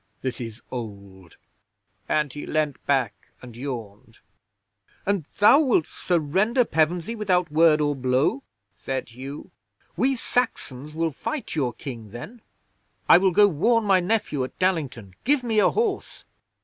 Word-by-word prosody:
This 130 -1 -3
is 115 -1 -7
old," 100 -7 -8 0.7
and 150 -3 +1
he 145 - -7
leaned 155 -2 -1
back 130 -6 0
and 125 -3 -12
yawned. 120 -6 -7 0.9
'"And 195 -6 0
thou 210 +8 +7
wilt 250 - +3
surrender 190 - +1
Pevensey 170 +6 0
without 180 -7 0
word 155 0 +5
or 145 -1 +1
blow?" 130 - +1 0.3
said 130 +7 -4
Hugh. 135 +5 -9 0.4
"We 270 +1 +2
Saxons 150 - -2
will 165 0 0
fight 295 - -5
your 135 -6 0
King 115 -3 -8
then. 205 - -9 0.7
I - - +8
will 190 0 +4
go 205 +3 +5
warn 220 +7 +2
my 195 -3 +4
nephew 180 -8 0
at 130 - -7
Dallington. 145 - -1
Give 280 0 +2
me 225 -3 +1
a - - +5
horse!" 430 -3 -2
155 Hz, 140 wpm, -24 LUFS, 130-205 Hz, 0.9 s, I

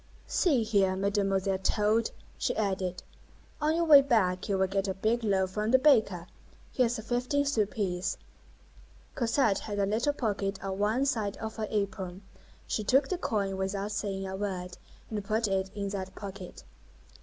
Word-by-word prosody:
"See 285 - +2
here, 200 -4 +2
Mam'selle 195 -1 0
Toad," 215 +3 +1 0.3
she - - -1
added, 190 -4 -1 0.6
"on 305 +1 +2
your 340 - +2
way 295 -3 +9
back, 210 -10 +1
you 195 - +2
will 190 - +3
get 195 +1 -1
a 190 - -2
big 225 +5 0
loaf 190 -3 +1
from 210 +2 -1
the 260 - +6
baker. 220 - +3 0.5
Here's 245 -2 +1
a 220 - -7
fifteen 250 +5 0
sou 225 -8 +1
piece." 185 -4 -2 1.0
Cosette 230 -4 +2
had 205 -2 -5
a 200 - +2
little 225 +8 +1
pocket 205 -6 -2
on 195 0 -3
one 220 +6 +2
side 220 -7 -1
of 220 0 -6
her 215 -1 -2
apron; 195 -2 -3 0.4
she 215 - -2
took 265 +6 +3
the 370 - -1
coin 200 - -1
without 195 +2 -2
saying 200 -2 -3
a 190 - -4
word, 185 -3 -4 0.4
and 210 -2 -3
put 220 +2 0
it 190 -1 0
in 200 -1 -3
that 190 -1 -5
pocket. 195 - -8
205 Hz, 170 wpm, -29 LUFS, 195-230 Hz, 1.0 s, way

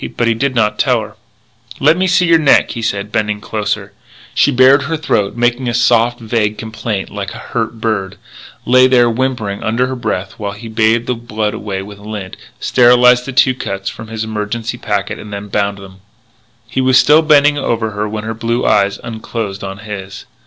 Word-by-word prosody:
But 120 - +1
he 115 - +3
did 130 +3 -1
not 105 -3 +1
tell - - +2
her. - - -10 0.6
"Let - - +4
me 185 +1 +1
see 180 0 +3
your 165 -1 +4
neck," 150 -3 +4
he 115 - -5
said, 105 -2 -2
bending 105 -1 -1
closer. 105 0 -3 0.4
She - - +3
bared 135 +1 +5
her 160 +3 -2
throat, 105 -10 -1
making 120 +1 +1
a 120 - -2
soft, 120 0 +2
vague 110 -2 -1
complaint 110 -2 -4
like 100 -1 -5
a - - -11
hurt 115 -1 -2
bird, 105 -4 -2 0.5
lay 130 +1 +5
there 120 -2 +4
whimpering 115 -5 -2
under 115 +3 0
her 130 +1 -4
breath 95 -6 -4
while 100 -1 -4
he 115 +3 -10
bathed 110 +1 +1
the 125 - -1
blood 110 -3 -3
away 95 -2 -4
with 100 0 -11
lint, 105 -2 -7 0.2
sterilised 125 0 +4
the - - -3
two 130 0 +4
cuts 100 -5 -4
from 110 - -10
his 110 0 -4
emergency 110 +2 -4
packet, 100 -1 -2
and 100 -1 -8
bound 100 0 0
them. 95 -1 -13 0.7
He 130 - -2
was 130 0 +4
still 150 +3 +6
bending 150 -2 +5
low 145 - -3
over 110 -2 -1
her 105 +1 -3
when 105 0 -5
her 115 +1 -3
blue 115 +2 -2
eyes 100 -2 +2
unclosed 110 -3 -5
on 95 0 -6
his. 100 -2 -7
110 Hz, 195 wpm, -15 LUFS, 105-125 Hz, 0.7 s, still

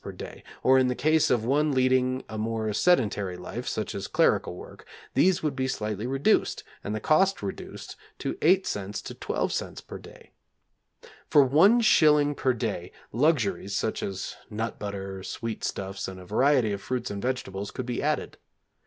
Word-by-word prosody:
per - - -6
day; - - -9 0.2
or 130 +1 +6
in 130 - +3
the 125 - 0
case 155 +3 +3
of 115 -3 +1
one 145 +4 +2
leading 130 0 +2
a 110 - -8
more 110 0 -2
sedentary 105 - +2
life, 105 +7 -6
such 110 - -2
as 100 0 -4
clerical - - +2
work, - - -11 0.3
these 185 -1 +3
would 150 -3 -1
be 130 -1 -1
slightly 110 -3 -3
reduced 135 +11 +1 0.2
and 105 - -3
the - - -2
cost 185 - +2
reduced 100 - -7 0.2
to - - -3
8c. 105 - +1
to - - -7
12c. - - -3
per - - -8
day. - - -15 1.0
For 145 - +6
one 175 - +5
shilling 150 -8 +5
per 130 -2 +1
day, 90 -6 -3 0.2
luxuries, 120 -7 +1
such 110 - -1
as 95 -1 -4
nut 110 +1 -4
butter, 95 -2 -5
sweet 115 +3 -5
stuffs, 95 0 -3
and 95 -1 -8
a 90 - -11
variety 130 +2 +3
of 100 -1 -3
fruits 125 +2 -3
and 100 -1 -4
vegetables 105 -6 -3
could 130 - -5
be 120 -1 -3
added. - - -2
120 Hz, 170 wpm, -27 LUFS, 100-145 Hz, 1.0 s, or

